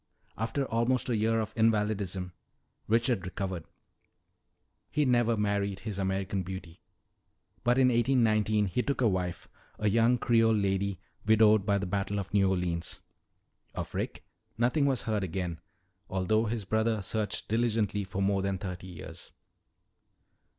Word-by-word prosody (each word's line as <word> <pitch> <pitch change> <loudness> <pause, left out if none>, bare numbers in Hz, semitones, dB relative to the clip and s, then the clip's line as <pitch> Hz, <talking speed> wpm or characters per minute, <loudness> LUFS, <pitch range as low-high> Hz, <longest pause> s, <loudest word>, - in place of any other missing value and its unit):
"After 115 +5 -1
almost 125 +2 0
a 120 - +2
year 110 +1 +2
of 110 - -3
invalidism, 105 -5 0 0.5
Richard 115 -2 +2
recovered. 90 -1 -4 1.2
He 150 - +1
never 120 -3 +3
married 100 -2 -1
his 105 -3 -5
American 95 0 -1
beauty. 90 -2 -8 0.8
But 120 +1 +3
in 130 -1 +5
1819 110 -4 +3
he 95 +5 0
took 140 +2 -2
a 125 - +4
wife, 90 -3 -2 0.3
a 105 - 0
young 115 +3 +4
Creole 115 -1 +3
lady 100 -2 0 0.3
widowed 110 -2 +5
by 100 -1 +3
the 100 - -2
Battle 100 +2 -2
of 95 -3 -5
New 100 -2 +4
Orleans. 90 -3 -2 0.8
Of - - -5
Rick - - -4 0.3
nothing 125 +5 +2
was 130 -3 +1
heard 110 -3 -1
again, 90 -2 -3 0.5
although 110 +4 +1
his 110 -2 -3
brother 110 +1 0
searched 105 0 -2
diligently 110 -3 +1
for 95 +1 -3
more 100 0 +2
than 95 0 -1
thirty 90 -1 -6
years." 85 -4 -10
105 Hz, 140 wpm, -29 LUFS, 95-115 Hz, 1.2 s, in